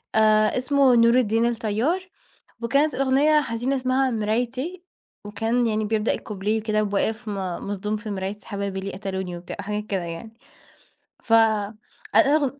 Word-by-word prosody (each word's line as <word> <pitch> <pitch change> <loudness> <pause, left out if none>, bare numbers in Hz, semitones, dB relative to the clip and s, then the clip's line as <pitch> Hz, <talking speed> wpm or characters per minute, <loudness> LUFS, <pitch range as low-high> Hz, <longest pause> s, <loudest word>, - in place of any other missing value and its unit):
آآ، 215 +1 +4
اسمه 265 0 +3
نور 235 0 +5
الدين 230 -1 +2
الطيار، 240 - 0 0.6
وكانت 280 +6 +2
الأغنية 275 +3 +3
حزينة 245 +1 -2
اسمها 260 0 +1
مرايتي. 250 - -2 0.4
وكان 225 +4 0
يعني 215 -1 0
بيبدأ 220 +1 0
الكوبليه 210 +1 -2
كده 215 -1 +1
وبواقف 220 +3 -1
م - - -2 0.3
مصدوم 210 +1 -2
في 215 0 -7
مرايتي 195 +1 -5
حبايبي 200 -1 -3
ليه 195 0 -5
قتلوني 190 -2 -4
وبتاع 175 0 -8
وحاجات 210 +1 -3
كده 195 -4 -2
يعني. 170 +7 -7 0.9
ف 225 - -1
ال 215 -2 +3 0.4
الأغن 280 +3 +3
220 Hz, 145 wpm, -24 LUFS, 210-255 Hz, 0.9 s, نور